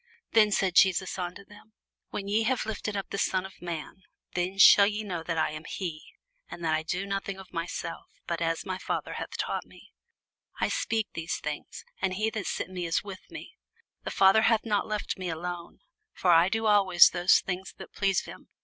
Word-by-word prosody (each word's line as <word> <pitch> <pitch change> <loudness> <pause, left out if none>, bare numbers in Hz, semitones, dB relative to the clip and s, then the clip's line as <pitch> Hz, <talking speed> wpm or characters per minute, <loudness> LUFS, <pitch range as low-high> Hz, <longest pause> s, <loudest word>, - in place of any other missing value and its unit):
Then 215 -2 +5
said 190 -2 +1
Jesus 190 0 +3
unto 180 +2 -5
them, 210 +2 -17 0.4
When 200 - -5
ye 210 +2 +2
have 240 +1 0
lifted 210 -1 -3
up 195 - -5
the 200 - -3
Son 185 -2 0
of 190 - -12
man, 170 +1 -6 0.3
then 180 +2 -2
shall 200 0 +8
ye 210 +1 -2
know 180 -5 -4
that 165 0 -3
I 155 -1 +1
am 155 +1 -7
he, 165 -5 -4 0.5
and 170 - -7
that 160 - +2
I 155 - +1
do 180 +5 -3
nothing 195 -1 -3
of 190 -2 -13
myself; 165 0 -5 0.2
but 170 -1 -3
as 165 0 -1
my 185 -1 -4
Father - - -3
hath - - -6
taught - - -2
me, - - -18 0.7
I - - +1
speak 225 - -1
these 165 +1 -3
things. - - -6 0.2
And 185 -1 0
he 215 +3 0
that 215 -4 -4
sent - - -3
me 180 -2 -3
is 165 - 0
with 195 -2 -10
me: 390 +6 -10 0.4
the - - -4
Father 195 +3 +5
hath 225 0 +3
not 210 -2 0
left 210 -2 -3
me 185 -1 -3
alone; 170 +1 -6 0.3
for 180 - +2
I 170 +2 +6
do 225 +2 -1
always 195 -4 +6
those 175 +1 +4
things 185 0 -5
that - - -11
please 195 -2 +1
him. - - -12
190 Hz, 205 wpm, -28 LUFS, 175-205 Hz, 0.7 s, shall